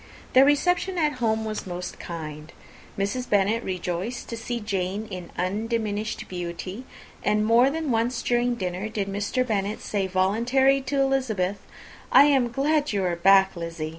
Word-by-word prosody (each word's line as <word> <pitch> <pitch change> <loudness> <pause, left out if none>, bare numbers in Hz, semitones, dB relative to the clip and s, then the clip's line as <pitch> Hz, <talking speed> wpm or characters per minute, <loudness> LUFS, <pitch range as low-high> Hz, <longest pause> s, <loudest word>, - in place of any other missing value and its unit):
Their 260 +1 +7
reception 355 +6 +2
at 300 -5 0
home 220 -1 +1
was 215 -2 -4
most 180 0 -6
kind. 155 -2 -7 0.5
Mrs. 225 +6 -2
Bennet 205 +3 +2
rejoiced 185 +5 -4
to 230 - -4
see 235 +1 -4
Jane 200 -1 -2
in 180 -2 -7
undiminished 215 +3 -2
beauty; 180 +6 -6 0.4
and 210 0 +2
more 235 +4 +5
than 315 -1 -2
once 235 +2 0
during 240 0 +1
dinner 185 0 -3
did 210 -2 -3
Mr. 205 +6 -1
Bennet 210 -2 -1
say 200 -2 -2
voluntarily 235 +9 +2
to 275 +1 -2
Elizabeth, 225 -8 0 0.5
"I - - +8
am 270 -4 +3
glad 290 +3 +1
you 200 -2 0
are 180 -1 0
come 170 - -16
back, 195 +1 +5
Lizzy." 165 -2 -5
215 Hz, 160 wpm, -25 LUFS, 185-250 Hz, 0.5 s, I